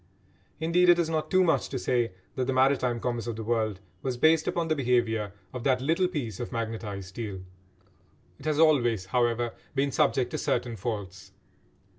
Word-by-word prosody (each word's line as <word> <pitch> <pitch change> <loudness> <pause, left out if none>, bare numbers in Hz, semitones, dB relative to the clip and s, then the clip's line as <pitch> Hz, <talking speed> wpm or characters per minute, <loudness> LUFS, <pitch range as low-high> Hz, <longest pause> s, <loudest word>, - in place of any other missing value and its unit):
Indeed, 170 +3 +3
it 175 - +7
is 165 -2 0
not 155 -1 -1
too 185 -1 +4
much 165 - +1
to 135 - -3
say 120 -4 0 0.2
that 130 - -1
the 135 - 0
maritime 130 -2 +2
commerce 120 -1 -2
of 115 - -3
the 110 - -5
world 110 -3 0 0.2
was 130 -2 -2
based 160 +4 +4
upon 170 -1 0
the 155 - +1
behaviour 120 -6 +1 0.2
of 125 -2 -5
that 130 -1 +3
little 165 +7 +2
piece 125 - -4
of 120 - -5
magnetised 110 -5 -4
steel. 100 -2 -6 1.0
It - - -13
has 155 -1 +1
always, 120 - +3
however, 120 +2 0 0.2
been 140 +1 +1
subject 135 -4 +2
to - - -3
certain 120 -2 -1
faults. 95 -3 -5
125 Hz, 180 wpm, -28 LUFS, 115-150 Hz, 1.0 s, it